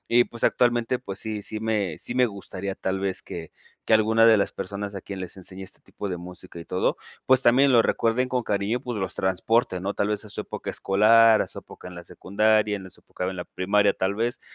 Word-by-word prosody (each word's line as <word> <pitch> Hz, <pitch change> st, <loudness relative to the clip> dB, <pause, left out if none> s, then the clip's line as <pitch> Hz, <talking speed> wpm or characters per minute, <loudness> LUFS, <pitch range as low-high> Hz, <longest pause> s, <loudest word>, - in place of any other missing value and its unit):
y 120 Hz, +1 st, +5 dB
pues 115 Hz, -, -8 dB
actualmente 120 Hz, 0 st, +2 dB
pues 100 Hz, -6 st, -6 dB
sí 110 Hz, -2 st, -4 dB
sí 110 Hz, -, -3 dB
me 105 Hz, -7 st, -1 dB
sí 120 Hz, -, -4 dB
me 125 Hz, 0 st, +4 dB
gustaría 100 Hz, -2 st, -6 dB
tal 95 Hz, 0 st, -2 dB
vez 95 Hz, -1 st, -2 dB
que 80 Hz, -2 st, -8 dB, 0.4 s
que -, -, 0 dB
alguna 110 Hz, +1 st, +4 dB
de 110 Hz, -2 st, +7 dB
las 100 Hz, -, 0 dB
personas 100 Hz, 0 st, -5 dB
a 95 Hz, -, -6 dB
quien 100 Hz, -1 st, -7 dB
les 90 Hz, +1 st, -7 dB
enseñé 95 Hz, +1 st, -8 dB
este 95 Hz, -, -11 dB
tipo 100 Hz, -, -7 dB
de 90 Hz, -, -3 dB
música 90 Hz, 0 st, -9 dB
y 85 Hz, -, -8 dB
todo, 90 Hz, -, 0 dB, 0.3 s
pues 130 Hz, 0 st, +5 dB
también 130 Hz, +3 st, +5 dB
lo 120 Hz, -3 st, +6 dB
recuerden 120 Hz, +4 st, 0 dB
con 125 Hz, -1 st, 0 dB
cariño, 105 Hz, +3 st, -1 dB
pues 120 Hz, -4 st, -5 dB
los 95 Hz, -2 st, -3 dB
transporte, 95 Hz, +2 st, +1 dB
¿no? 100 Hz, +2 st, -2 dB
Tal 100 Hz, -, -1 dB
vez 105 Hz, +1 st, -2 dB
a 105 Hz, -, -11 dB
su -, -, -4 dB
época -, -, -6 dB
escolar, 110 Hz, +3 st, +5 dB
a -, -, -5 dB
su -, -, -7 dB
época -, -, -11 dB
en 90 Hz, -, -11 dB
la 85 Hz, 0 st, -9 dB
secundaria, 105 Hz, +3 st, +1 dB
en 95 Hz, -, -9 dB
la 95 Hz, -, -11 dB
su -, -, -12 dB
época 90 Hz, -, -5 dB
en 95 Hz, -, -5 dB
la 90 Hz, -, -5 dB
primaria 100 Hz, +2 st, +1 dB
tal 95 Hz, +1 st, -1 dB
vez, 115 Hz, +4 st, -2 dB
105 Hz, 245 wpm, -25 LUFS, 95-115 Hz, 0.4 s, de